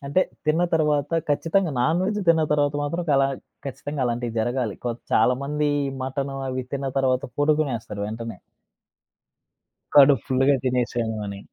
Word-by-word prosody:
అంటే, 145 +7 +2 0.3
తిన్న 160 +3 +3
తర్వాత, 150 -2 +1 0.2
ఖచ్చితంగా 165 +4 +1
నాన్‌వెజ్ 180 - +1
తిన్న 165 -1 +5
తర్వాత 145 -1 +1
మాత్రం, 170 +5 -2
చాలా 135 -1 +4 0.4
ఖచ్చితంగా 140 +1 -4
అలాంటియి 120 -1 -2
జరగాలి. 120 -2 -1
కొద్ 120 0 -3
చాలామంది 140 +6 +2 0.2
ఈ 135 - -3
మటను 135 +1 -3
అవి 130 0 -2
తిన్న 135 0 -2
తర్వాత, 130 -1 +1 0.2
పడుకునేస్తరు 135 -9 0
వెంటనే. 110 -2 -6 1.6
కడుపు 140 -4 +7
ఫుల్లుగా 135 +1 +3
తినేసాను 120 -3 0
అని. 100 -1 -6
135 Hz, 130 wpm, -24 LUFS, 120-150 Hz, 1.6 s, కడుపు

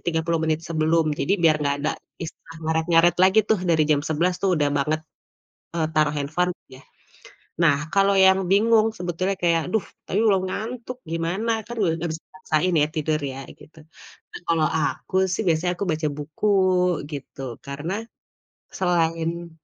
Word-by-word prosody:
30 165 0 0
menit 160 0 0
sebelum 160 -1 +1
jadi 195 - +1
biar 155 -2 +5
gak 140 0 +1
ada - - +1 0.3
istilah 165 0 -9
ngaret 160 +1 0
ngaret 170 +1 +5
lagi 195 +4 +5
tuh 215 -4 +2
dari 160 -3 +3
jam 145 - +4
11 175 +4 0
tuh 190 -2 +3
udah 145 -1 +2
banget, 155 +3 0 0.8
e - - -2 0.2
taruh 150 -1 +3
handphone 175 +5 0 0.2
yah. 130 +1 -14 0.8
Nah 145 -4 +5 0.2
kalau 195 0 +4
yang 190 0 +6
bingung 220 +2 +4
sebetulnya 180 +2 -2
kayak, 165 -2 +2
duh 220 - +2 0.2
tapi 200 - 0
belom 195 -4 +3
ngantuk 245 +4 -5
gimana? 170 +8 -1 0.2
Kan 240 - -6 0.2
gak 170 0 -2
bisa 160 - -5
dipaksain 180 -1 -1
ya - - +2
tidur 155 0 0 0.2
ya 135 - -8 0.2
gitu. 160 +1 -16 0.6
Nah - - -8
kalau 165 -2 +2
aku 160 +3 -2 0.2
sih, 220 - -1
biasanya 170 +2 +2
aku 200 - -1 0.3
buku 155 +8 -3 0.6
gitu 140 -1 -8 0.2
karena, 145 +6 -4 0.9
selain 170 -1 0
165 Hz, 155 wpm, -23 LUFS, 155-185 Hz, 0.9 s, yang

